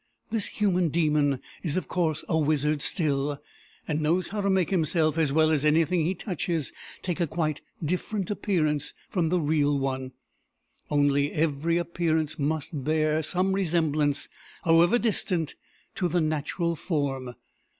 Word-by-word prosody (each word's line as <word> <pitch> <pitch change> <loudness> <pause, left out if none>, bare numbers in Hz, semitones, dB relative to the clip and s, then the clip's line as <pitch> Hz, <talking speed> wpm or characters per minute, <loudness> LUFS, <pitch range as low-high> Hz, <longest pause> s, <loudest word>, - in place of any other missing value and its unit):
This 220 -3 0
human 185 -5 +1
demon 150 -4 +2 0.2
is 160 0 -1
of 185 - -2
course 160 -4 0
a 160 - 0
wizard 150 -1 +1
still, 145 -4 0 0.5
and 155 -1 -1
knows 170 +4 +1
how 210 0 -2
to 200 - +1
make 190 -3 +2
himself, 160 -3 +2
as 160 -4 +2
well 155 +2 +4
as 150 -2 +2
anything 160 +3 +3
he 180 +4 0
touches, 170 - -2 0.3
take 180 -1 -2
a 170 - +1
quite 155 -1 -2 0.2
different 185 +4 -2
appearance 155 -8 0 0.2
from 175 -6 +1
the 180 +1 +2
real 145 -2 +2
one; 130 -1 -2 0.8
only 145 0 +2
every 160 +2 +1
appearance 165 -3 -1
must 150 -1 -2
bear 155 +1 +1
some 185 +5 0
resemblance, 160 -6 +1 0.4
however 170 +6 +5
distant, 185 -8 0 0.4
to 180 - 0
the 175 0 +1
natural 155 +2 -1
form. 135 -7 -2
160 Hz, 145 wpm, -27 LUFS, 150-175 Hz, 0.8 s, however